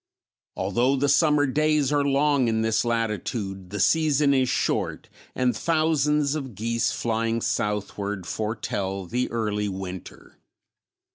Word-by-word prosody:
Although 120 +8 +1
the 140 +1 +1
summer 145 +1 +4
days 150 0 +1
are 145 -1 +2
long 140 -1 +2
in 110 -1 +1
this 110 -1 +1
latitude 105 -4 -2
the 105 +2 -5
season 150 - +3
is 130 -2 +2
short - - -1 0.3
and 125 -1 +1
thousands 150 -3 +1
of 135 -7 -5
geese 115 +2 0
flying 115 0 -1
southward 105 -3 -2
foretell 100 -2 -3
the 125 +7 -2
early 105 -3 -1
winter. 95 -1 -8
115 Hz, 125 wpm, -25 LUFS, 105-140 Hz, 0.3 s, summer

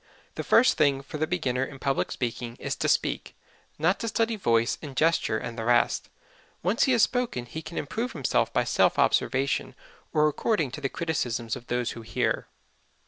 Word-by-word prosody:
The - - -4
first 245 +3 +5
thing 140 -2 +3
for 150 +2 -7
the 155 - +1
beginner 135 -8 0
in 140 +1 -6
public 135 0 -1
speaking 120 -1 -3
is - - -2
to - - 0
speak - - 0 0.4
not 165 +6 +2
to 230 - -3
study 225 +1 +1
voice 115 - +1
and 140 -4 -8
gesture 160 -8 +2
and 115 +1 -6
the - - -2
rest. 120 +1 +2 0.5
Once 190 +7 +3
he 265 - +2
has 230 -3 +4
spoken 245 - 0
he 140 +7 -7
can 160 +1 -8
improve 225 - -3
himself 140 -6 +1
by - - +2
self - - +2
observation 135 +1 +1 0.4
or 150 0 +4
according 155 - 0
to 150 - -7
the 135 - -1
criticisms 120 -9 -2
of 120 - -11
those 120 -1 -1
who 115 - -8
hear. 110 - -1
145 Hz, 190 wpm, -27 LUFS, 120-175 Hz, 0.5 s, first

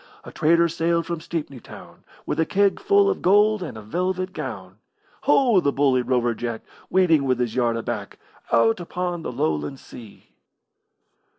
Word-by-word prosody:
A - - -10
trader 170 +1 +3
sailed 170 +1 0
from 170 -2 -4
Stepney 150 -6 -5
Town - - -14 0.2
With - - -3
a 160 - +3
keg 200 0 +2
full 405 -1 +3
of 400 - -1
gold 210 +2 +4
and 155 -10 -6
a 110 - -9
velvet 185 - -2
gown. 100 -10 -7 0.5
Ho, 260 -7 +4
the 140 -5 +1
bully 135 -2 +2
Rover 120 -1 0
Jack, 115 0 -5 0.3
Waiting 170 -6 +3
with 130 -2 0
his 120 -3 -1
yard 120 -2 +1
aback 115 - -5 0.3
Out 115 -1 +3
upon 175 0 -4
the - - -5
Lowland 80 - -2
Sea. 105 - -14
155 Hz, 165 wpm, -23 LUFS, 120-180 Hz, 0.5 s, gold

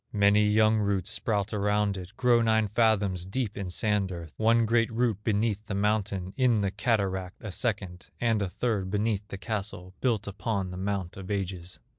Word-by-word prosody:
Many 105 0 +4
young 110 +1 +4
roots 100 -1 0
sprout 105 -3 -1
around 105 0 +1
it, 95 +1 -8
Grow 120 -2 +4
nine 110 -1 +3
fathoms 105 -5 +2
deep 105 0 -2
in 100 -2 -4
sand 100 0 0
earth, 85 -3 -7
One 115 +1 +3
great 115 +1 +2
root 115 -3 0
beneath 105 -1 0
the 100 - -3
mountain, 100 -2 0
In 125 -5 +3
the 100 -1 0
cataract 95 -4 -1
a 105 - -6
second, 95 -5 -3
And 115 -3 +1
a 100 - -1
third 100 -2 -1
beneath 105 0 -1
the 100 - -6
castle 95 -3 -5
Built 115 -6 +1
upon 100 -1 -2
the 90 - -6
mount 95 -2 -3
of 95 -1 -8
ages." 95 -3 -3
105 Hz, 180 wpm, -28 LUFS, 95-110 Hz, -, Many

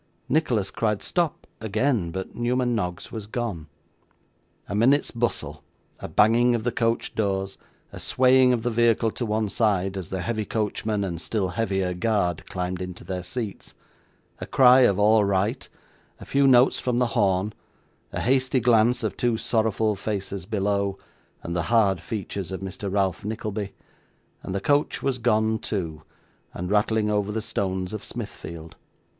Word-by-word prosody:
Nicholas 125 -10 +1
cried 105 -3 -1
stop, 170 -4 -1
again, 110 -2 0
but 95 +2 -5
Newman 125 +1 0
Noggs 90 -6 -3
was 110 -3 -6
gone. 105 -9 -4 1.0
A - - -5
minute's 130 +8 +3
bustle, 75 - -2 0.4
a - - -6
banging 120 +3 +4
of 115 - -2
the 125 - 0
coach 115 0 -1
doors, 95 -2 -1 0.3
a - - -9
swaying 130 0 +4
of 120 -3 0
the 120 - 0
vehicle 115 -1 +3
to 120 - -3
one 110 0 0
side, 100 -3 +1
as 95 -4 -5
the 95 -2 -3
heavy 110 -2 -1
coachman, 105 -1 -2
and 85 -4 -4
still 100 -3 -1
heavier 95 -2 -1
guard, 90 -4 0
climbed 90 0 -3
into 90 -1 -7
their 90 +1 -4
seats; 105 +2 -5 0.6
a - - -6
cry 130 -1 +6
of 100 -7 +4
all 105 +1 +5
right, 100 0 0 0.5
a - - -10
few 140 0 +3
notes 125 -1 +5
from 125 -1 -1
the 125 - +3
horn, 100 -1 +1 0.6
a - - -3
hasty 130 0 +2
glance 120 0 +3
of - - -2
two 120 -2 +1
sorrowful 110 -2 +1
faces 100 -2 -4
below, 100 -2 0 0.5
and 85 - -4
the 85 - +1
hard 100 -7 +3
features 100 -2 -5
of 95 - -5
Mr 95 +1 -5
Ralph 95 -3 0
Nickleby 105 -2 -4 0.7
and 95 - -5
the 100 - -1
coach 145 +4 +1
was 135 -2 0
gone 110 -1 +2
too, 85 -9 -4 0.5
and 90 +2 -4
rattling 105 0 +2
over 105 -1 0
the 110 - -2
stones 95 -3 -3
of 110 - -5
Smithfield. 85 -8 -7
105 Hz, 160 wpm, -25 LUFS, 95-120 Hz, 1.0 s, cry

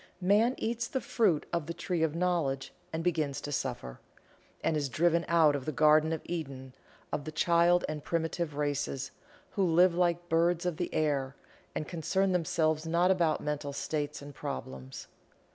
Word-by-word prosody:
Man 210 +7 +3
eats 235 +1 -2
the 265 - -2
fruit 200 -12 +1
of 170 -3 -1
the 170 - -4
Tree 170 0 -2
of 160 -1 +1
Knowledge 165 -7 0 0.2
and 160 +1 -3
begins 155 -5 0
to 145 - -5
suffer, 125 - -3 0.6
and 160 - +1
is 145 -2 -1
driven 170 +5 +2
out 160 -3 +4
of 135 -2 -4
the 155 - -1
Garden 155 +2 +4
of 160 - -2
Eden 135 -6 -5 0.4
of 145 - -2
the 155 - -6
child 170 +2 +3
and 150 -1 -5
primitive 165 -1 -2
races, 145 -2 -2 0.4
who 195 - 0
live 175 +1 +5
like 175 -1 +2
the - - -29
birds 170 +1 +2
of 175 -3 -1
the 175 - -2
air 140 -3 0 0.4
and 155 - -3
concern 190 +3 0
themselves 160 -2 +1
not 170 +3 +3
about 170 -4 +2
mental 145 -1 -3
states 145 0 -3
and 145 0 -9
problems. 65 - -6
160 Hz, 175 wpm, -30 LUFS, 145-175 Hz, 0.6 s, live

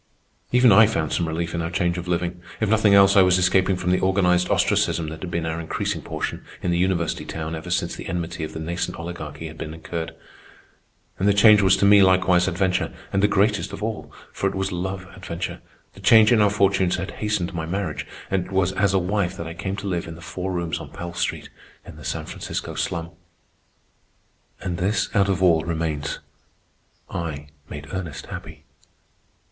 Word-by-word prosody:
Even 125 -1 +6
I 110 +3 +8
found 80 -8 -1
some 85 - 0
relief 85 +1 -3
in 85 - -1
our 85 - -2
change 85 -1 0
of 90 - -7
living. 90 0 -2 0.2
If 110 - +1
nothing 110 -2 +4
else, 100 0 +6
I 100 - +8
was 90 -1 +5
escaping 95 +1 +3
from 90 0 -1
the 90 - +3
organized 90 -2 +2
ostracism 80 -2 +1
that 80 0 -8
had 90 - -5
been 85 -1 -2
our 80 0 -2
increasing 80 - -3
portion - - -4 0.2
in 90 - +1
the 85 - +1
university 90 -2 0
town 80 0 -5
ever 80 +2 -6
since 90 - -1
the - - -8
enmity 85 -1 -3
of 80 - -5
the - - -6
nascent 85 +2 -3
Oligarchy 80 -3 -7
had 80 0 -9
been 80 0 -5
incurred. 80 0 -5 1.0
And 95 - +2
the 100 - +4
change 105 0 +7
was 95 -1 +4
to - - +2
me 100 0 +7
likewise 95 -1 +4
adventure, 95 0 0 0.2
and 95 - +2
the 105 - +5
greatest 105 +1 +1
of 105 - -6
all, 110 0 -4 0.2
for 95 - -1
it - - -7
was 95 +1 -1
love 95 +1 -4
adventure. 85 -3 -5 0.3
The - - -15
change 110 -1 +6
in 115 -3 +5
our 105 - +5
fortunes 95 -3 +2
had 95 +2 -4
hastened 105 -5 -1
my 80 -2 -4
marriage, 90 -3 -3 0.2
and 95 -2 +1
it - - -13
was 95 -1 +2
as 100 0 +1
a - - +5
wife 95 0 -1
that 85 - -5
I 80 - -6
came 95 +3 -4
to 100 0 -6
live 90 -3 -2
in 80 - -7
the 85 - -13
four 90 +2 -4
rooms 85 -3 -2
on - - -9
Pell 85 0 -7
Street, - - -3 0.3
in - - -11
the - - -12
San - - -3
Francisco - - -5
slum. 85 +1 -3 1.5
And 90 -2 -3
this 100 +3 0
out 100 -1 +3
of 95 -1 0
all 85 -3 +5
remains: 80 -3 -2 0.9
I 75 -3 -5 0.2
made 75 0 -7
Ernest 85 -7 -5
happy. - - -9
90 Hz, 205 wpm, -23 LUFS, 85-95 Hz, 1.5 s, I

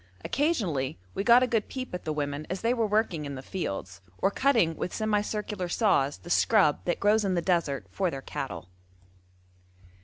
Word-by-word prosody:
Occasionally 185 - 0 0.2
we 195 - -2
got 240 +3 +7
a - - +2
good 225 -3 0
peep 255 -5 -6
at 180 - -5
the 155 - -1
women 145 0 -3
as 185 +2 -3
they 230 +2 +2
were 230 -3 +1
working 210 -7 0
in 140 -1 -5
the 130 - -8
fields, 95 - -5 0.2
or 195 - +1
cutting 225 -11 +2
with 180 - -3
semi 215 -1 +1
circular 210 -3 -3
saws 150 - +2
the 175 - -12
scrub 190 -10 +3
that 175 - 0
grows 210 +2 +3
in 190 -2 0
the - - +2
desert 165 - 0
for 185 - 0
their 135 -4 -6
cattle. 90 -10 -5
185 Hz, 190 wpm, -28 LUFS, 145-215 Hz, 0.2 s, got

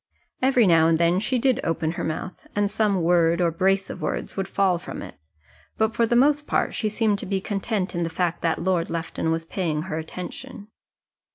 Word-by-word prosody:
Every 255 -3 +4
now 165 -3 +5
and 165 -1 +3
then 170 +2 +3
she 250 +5 0
did 255 +1 +2
open 165 -1 -1
her 170 - -4
mouth, 160 +3 -5
and 205 0 +1
some 200 -5 +1
word 170 0 +3
or 170 -2 +2
brace 190 +3 +1
of - - -8
words - - -3
would 195 -1 -2
fall 190 -3 +1
from - - -7
it. - - -9 0.6
But 220 0 +1
for 230 - +2
the 240 - +1
most 290 +4 +3
part - - 0
she 215 - -1
seemed 210 -1 +1
to - - -5
be 195 0 0
content 195 0 -2
in 175 - -2
the 165 - -1
fact 170 0 -1
that 165 -1 +1
Lord 180 -2 +1
Lufton 165 -1 -3
was 165 0 -1
paying 165 -4 -2
her 160 -3 -4
attention. 180 +5 -8
185 Hz, 210 wpm, -24 LUFS, 165-210 Hz, 0.6 s, now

